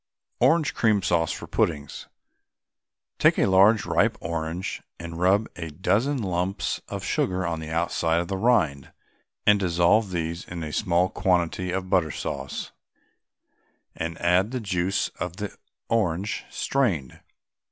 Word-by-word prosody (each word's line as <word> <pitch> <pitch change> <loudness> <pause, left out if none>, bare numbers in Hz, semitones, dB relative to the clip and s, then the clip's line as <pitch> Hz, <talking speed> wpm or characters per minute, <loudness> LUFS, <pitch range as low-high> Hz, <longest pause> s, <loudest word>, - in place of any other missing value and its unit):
ORANGE 165 -3 +3
CREAM 105 -4 +2
SAUCE 85 -3 +1
FOR - - -6
PUDDINGS. 75 -4 -2 1.1
Take - - +5
a - - +3
large 100 +3 +5
ripe - - +2
orange 85 +2 -4 0.2
and 85 0 -7
rub 95 +4 +3
a 85 -2 -5
dozen 105 - +1
lumps 90 +1 -1
of - - -5
sugar 95 0 0
on 85 -1 -2
the 80 0 -7
outside 85 0 +1
of 85 - -2
the 95 - -2
rind 95 - +1 0.5
and 105 -1 +5
dissolve 90 +3 +3
these 85 -1 -3
in 85 -2 -6
a 75 -1 -5
small 90 -3 +2
quantity 90 0 0
of 95 +1 -3
butter 90 -4 +3
sauce, - - -5 1.2
and 80 +1 -4
add 90 +4 +3
the 130 +1 -3
juice 95 -3 0
of 90 0 -4
the 105 -1 -5 0.3
orange, 100 -3 0
strained. 95 - -1
90 Hz, 140 wpm, -25 LUFS, 85-100 Hz, 1.2 s, Take